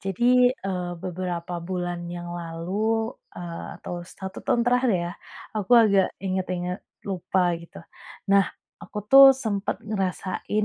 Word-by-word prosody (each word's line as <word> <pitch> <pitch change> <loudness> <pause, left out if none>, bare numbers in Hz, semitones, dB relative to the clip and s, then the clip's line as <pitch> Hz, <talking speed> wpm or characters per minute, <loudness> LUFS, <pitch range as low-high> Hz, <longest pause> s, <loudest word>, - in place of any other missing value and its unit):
jadi, 195 +4 -2 0.4
eee, 180 -2 -2
beberapa 180 -1 -4 0.2
bulan 175 -1 -3
yang 175 0 -6
lalu, 195 +7 -2 0.2
eee, 170 -1 -6
atau 175 - -6
1 190 +2 -8
tahun 235 0 +1
terakhir 250 0 +3
ya 175 - -4 0.5
aku 210 +3 -1
agak 200 -5 +5 0.2
inget-inget 185 -1 -2 0.2
lupa 185 -2 0
gitu. 170 - -14 0.6
Nah, 200 -1 +5 0.3
aku 210 - -7
tuh 275 0 +11
sempet 210 -6 -2
ngerasain 200 0 -2
185 Hz, 125 wpm, -25 LUFS, 175-210 Hz, 0.6 s, tuh